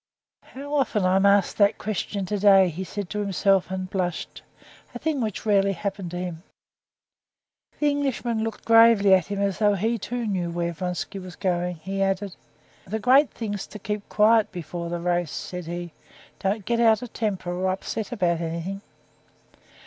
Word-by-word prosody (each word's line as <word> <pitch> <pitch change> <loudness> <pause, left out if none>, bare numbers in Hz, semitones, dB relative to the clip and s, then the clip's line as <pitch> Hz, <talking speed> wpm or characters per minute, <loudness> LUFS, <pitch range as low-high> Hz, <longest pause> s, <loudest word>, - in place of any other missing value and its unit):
"How 285 +2 -9
often 260 -9 +1
I'm 190 +2 +4
asked 200 0 +3
that 205 0 +4
question 200 -1 -3
today!" 195 -1 +5
he 175 +3 -5
said 200 +1 -5
to 210 - -2
himself, 195 -1 +2
and 190 0 -3
he 185 - -9
blushed, 180 -3 -3 0.5
a - - -2
thing 310 -4 -1
which 215 -2 -3
rarely 200 -2 +3
happened 195 0 -4
to 175 - -6
him. 175 -2 -5 1.4
The 295 -1 +3
Englishman 250 -5 -1
looked 225 -1 -5
gravely 225 -3 +6
at 185 -3 +3
him; 205 0 -4
and, 200 0 +1
as 190 - -7
though 205 -1 +3
he, 225 +4 0
too, 245 0 -4
knew 185 -5 -1
where 170 0 -2
Vronsky 180 +3 -4
was 185 -1 -9
going, 180 -2 -1
he 195 +4 -4
added: 195 0 -1 0.5
"The 215 +4 -2
great 260 +6 +5
thing's 205 -3 -5
to - - -9
keep 210 0 -5
quiet 220 +1 +4
before 170 0 -6
a 175 - -2
race," 175 -1 0
said 180 +3 -6
he; 175 0 -5 0.5
"don't 195 +1 -1
get 235 -1 0
out 225 -1 +4
of 245 - -9
temper 195 -5 -2
or 185 +1 -1
upset 200 +2 -4
about 175 -7 0
anything." 170 +4 -4
195 Hz, 180 wpm, -25 LUFS, 180-215 Hz, 1.4 s, gravely